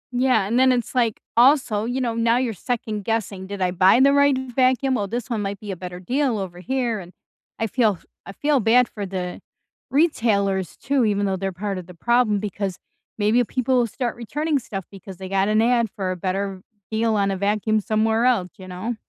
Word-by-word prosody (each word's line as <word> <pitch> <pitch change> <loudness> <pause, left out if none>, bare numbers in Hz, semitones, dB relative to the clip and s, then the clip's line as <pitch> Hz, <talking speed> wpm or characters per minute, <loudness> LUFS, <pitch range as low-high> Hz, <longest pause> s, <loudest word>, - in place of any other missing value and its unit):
Yeah, 245 -5 +3
and 230 +5 +1
then 260 0 +5
it's 245 -1 -1
like, 235 -4 +1 0.2
also, 240 -4 +4
you 245 +3 -2
know, 240 -3 -1
now 230 +1 +2
you're 250 -3 0
second-guessing, 215 -3 -3
"Did 200 -1 -6
I 180 - +1
buy 185 +6 +5
the 275 +1 +5
right 285 -1 +4
vacuum, 260 +1 +1
well, 205 -5 -1
this 235 +3 -4
one 225 -3 -1
might 200 -1 -4
be 210 -2 -6
a - - -4
better 180 0 -7
deal 250 +4 0
over 180 -3 -6
here, 240 0 -1
and" 180 0 -11 0.5
I 225 - +1
feel 215 -5 +1 0.3
I - - -8
feel 290 +6 +1
bad 240 +2 +4
for 205 -2 -6
the 180 -1 -5 0.5
retailers, 200 - +1
too, 275 -2 +1
even 205 -1 +1
though 195 -1 0
they're 195 +1 -2
part 195 +2 -4
of 175 - -10
the 180 - -11
problem 235 +2 +2
because 200 -2 -4 0.4
maybe 220 +4 +3
people 255 +2 -1
will 235 - +2
start 240 +1 -3
returning 290 +6 -1
stuff 195 -6 -6
because 195 -2 -11
they 190 -1 -7
got 195 0 +1
an 215 +1 +3
ad 235 -1 +2
for 190 -2 -2
a - - -2
better 190 +1 -3 0.3
deal 220 0 +1
on 200 -1 +1
a 190 - -2
vacuum 210 +2 +1
somewhere 220 +2 +1
else, 215 -8 +2
you 185 -2 -11
know? 185 +7 -4
215 Hz, 210 wpm, -22 LUFS, 195-245 Hz, 0.5 s, then